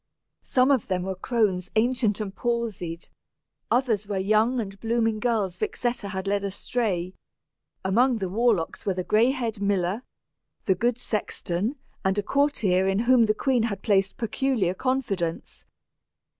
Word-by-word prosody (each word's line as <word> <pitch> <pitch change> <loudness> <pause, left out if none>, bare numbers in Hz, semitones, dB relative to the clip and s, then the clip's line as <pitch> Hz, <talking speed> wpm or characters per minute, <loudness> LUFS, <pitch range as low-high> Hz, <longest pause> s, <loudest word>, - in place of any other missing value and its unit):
Some 255 +2 +3
of 260 -6 +2
them 185 -2 -1
were 190 +1 -2
crones 190 -2 0
ancient 225 -2 +2
and 200 -2 -4
palsied, 215 -8 -3 0.6
others 230 -5 +1
were 200 -2 -2
young 215 +6 +2
and 195 -3 -5
blooming 225 -1 0
girls 215 -6 0
Vixetta 240 -4 -2
had 190 -1 -4
led 200 0 0
astray; 195 -2 -2 0.7
among 240 +6 +3
the 195 -3 -2
warlocks 205 -3 0
were 195 - -1
the 185 - -2
gray 220 +6 +3
haired 230 -6 -2
miller, 200 +1 0 0.6
the 190 - +4
good 235 +4 0
sexton, 210 0 -2 0.3
and 190 0 +1
a 205 - +1
courtier 210 -10 +2
in 195 0 +1
whom 240 -1 +5
the 215 0 +1
queen 260 0 +1
had 200 - -6
placed 195 -2 +2
peculiar 230 -4 0
confidence. 200 -8 -2
215 Hz, 145 wpm, -26 LUFS, 190-240 Hz, 0.7 s, whom